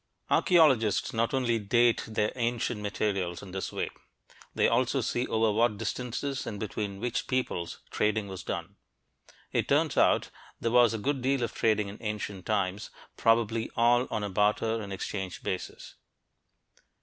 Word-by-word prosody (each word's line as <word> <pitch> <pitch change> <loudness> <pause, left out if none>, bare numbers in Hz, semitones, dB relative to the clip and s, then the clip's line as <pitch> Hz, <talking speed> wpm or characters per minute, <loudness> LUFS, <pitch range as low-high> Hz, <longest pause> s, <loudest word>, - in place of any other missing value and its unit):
Archeologists 135 - +4
not 115 0 +1
only 120 -4 +1
"date" 120 +3 +3
their 110 -1 0
ancient 120 -2 -1
materials 100 -4 -2
in 95 - -10
this 95 0 -4
way; - - -2 0.7
they - - +4
also 130 +3 +2
see 120 +1 -1
over 110 -1 +2
what 110 0 +2
distances 130 +5 -3
and 105 -2 -5
between 100 -2 -4
which 120 +2 -2
peoples 125 -10 -2
trading 105 -1 0
was 95 -2 -6
done. - - -5 0.7
It - - 0
turns - - +2
out - - +4
that - - -13 0.3
there 115 - -1
was 120 -2 +5
a - - -1
good 135 +5 -1
deal 135 0 +1
of 115 - -2
trading 105 -2 +1
in 100 +1 -9
ancient 105 -3 -4
times, 100 -1 -1 0.3
probably 115 0 +2
all 120 +2 +4
on 105 - -2
a 105 - -2
barter 105 +3 +1
and 100 -2 -7
exchange 95 -1 -5
basis. 95 - -5
110 Hz, 160 wpm, -29 LUFS, 105-120 Hz, 0.7 s, was